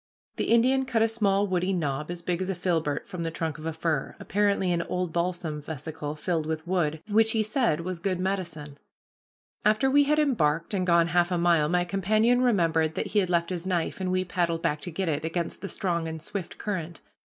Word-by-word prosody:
The - - 0
Indian 255 +3 +3
cut 230 -3 +2
a - - +4
small 205 -3 +1
woody 185 0 0
knob 150 -3 -2
as 175 -1 -5
big 175 +1 -1
as 185 - -2
a 190 - -1
filbert 160 -5 -1
from 180 -3 -6
the 165 - -1
trunk 160 -2 -3
of 155 - -5
a - - -1
fir, 160 -3 -2
apparently 200 -2 +1
an 170 -1 +1
old 180 -1 -3
balsam 170 -3 -2
vesicle 150 0 -5
filled 160 0 -2
with 160 0 -3
wood, 165 -4 0
which 220 +1 +3
he 220 -1 +2
said 215 - +1
was 180 0 -4
good 185 0 -1
medicine. 170 -7 -3 0.8
After 215 +6 +3
we 285 +1 +5
had 300 +2 +2
embarked 170 - +1
and 185 -2 0
gone 170 -1 +4
half 175 0 +3
a 180 - 0
mile, 170 -3 +3
my 175 +1 +2
companion 215 +7 +2
remembered 165 -9 +2
that - - -2
he 210 - +4
had 185 -3 0
left 170 0 +1
his 180 0 -4
knife, 180 0 -1
and 185 -1 -1
we 185 0 +1
paddled 170 -2 -1
back 150 0 0
to - - -5
get 185 +2 -3
it, 155 -1 -1
against 165 +1 -3
the 195 - -4
strong 170 -3 -1
and 160 0 -5
swift 175 +3 -5
current. 175 -5 -4
175 Hz, 220 wpm, -27 LUFS, 160-195 Hz, 0.8 s, we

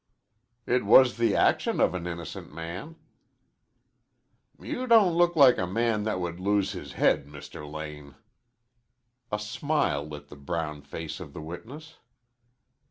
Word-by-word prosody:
"It 125 -1 +1
was 125 +5 +6
the 115 -3 +2
action - - +2
of - - +3
an 90 -1 -4
innocent 85 -2 -7
man." 90 - -7 1.6
"You 255 +1 -4
don't 220 -7 +6
look 175 0 +3
like 135 -5 +6
a 90 - -1
man 110 +2 0
that 110 -4 -1
would 85 -1 -4
lose 100 +1 +1
his - - -8
head, 70 - +2
Mr. 75 0 -10
Lane." 75 -2 -8 1.2
A 105 - 0
smile 105 - -1
lit 75 -1 -10
the - - -11
brown 75 0 -4
face 75 +4 -7
of 75 -7 -9
the - - -7
witness. 135 - -9
90 Hz, 140 wpm, -27 LUFS, 75-125 Hz, 1.6 s, was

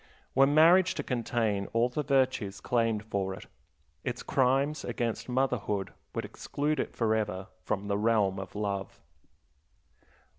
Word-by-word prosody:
Were 135 +1 +5
marriage 165 +5 +5
to 145 - -3
contain 115 -5 -1
all 115 +1 +3
the 125 +5 -2
virtues 130 -8 +1
claimed 115 -3 0
for 95 -3 -2
it, - - -11 0.6
its 125 -1 -3
crimes 135 +3 +1
against 115 0 -3
motherhood 125 -6 0 0.2
would - - -2
exclude 150 0 -2
it - - -3
forever 110 -5 0 0.2
from 100 -1 -2
the 100 0 0
realm 105 -3 +2
of 95 - -8
love. 100 -1 -3
115 Hz, 135 wpm, -29 LUFS, 100-135 Hz, 0.6 s, Were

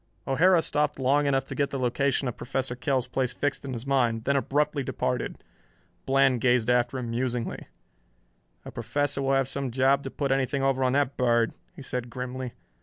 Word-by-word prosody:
O'Hara 165 +5 +4
stopped 150 -1 0
long 140 +2 +2
enough 135 -1 +1
to - - -7
get 140 -1 0
the 140 - -3
location 130 +2 0
of 125 - -3
Professor 130 -1 -3
Kell's 130 -1 0
place 130 -2 -1
fixed 145 -1 -2
in 135 -2 -5
his 120 +1 -6
mind, 120 -5 +1
then 140 +3 +1
abruptly 145 +2 +1
departed. 125 -1 -3 0.6
Bland 135 -2 +3
gazed 125 -1 +3
after 125 +1 +1
him 120 -2 -4
musingly. 120 0 -2 1.0
"The - - -9
Professor 145 -1 -2
will 135 0 +1
have 135 -1 +2
some 135 -1 -3
job 135 +3 +3
to 135 - -5
put 140 0 -2
anything 135 +1 0
over 135 -1 +2
on 130 0 +2
that 140 -1 +1
bird," 120 -2 +2 0.2
he 140 - -9
said 125 -2 -4
grimly. 125 0 -5
135 Hz, 185 wpm, -27 LUFS, 125-140 Hz, 1.0 s, O'Hara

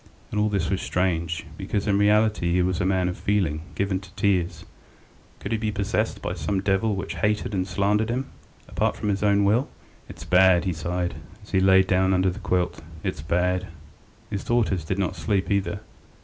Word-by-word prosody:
And 105 - -1
all 105 0 +2
this 95 -4 -1
was 95 - 0
strange, 85 -3 -1
because 100 - -2
in 100 -1 +2
reality 105 -4 +3
he 90 0 +3
was 90 0 0
a 90 - +1
man 95 -1 +1
of 90 - -2
feeling, 90 -7 0
given 100 -1 0
to 95 -1 -14
tears. 90 -4 0 0.7
Could 100 - -6
he 115 - 0
be 110 -1 -1
possessed 105 +1 -1
by - - -2
some 90 +3 -1
devil 100 +2 +1
which 95 +1 -5
hated 105 0 0
and 95 -1 -1
slandered 100 +4 +1
in 120 - 0
him, 135 - -11 0.4
apart - - 0
from 105 - -3
his 100 -1 0
own 100 -1 +3
will? 110 +7 +2 0.4
"It's - - -9
bad," 90 0 +5
he 90 - 0
sighed, 90 +2 -2 0.3
as - - -15
he 95 - +3
lay 95 0 +6
down 95 0 +2
under 95 0 +2
the 95 - -8
quilt. 90 -5 -1 0.2
"It's - - -3
bad." 90 +4 0 0.6
His 100 - -3
daughters 110 -8 +1
did 95 +4 -2
not 95 -1 -1
sleep 95 +4 -1
either. 100 0 0
95 Hz, 200 wpm, -25 LUFS, 90-105 Hz, 0.7 s, lay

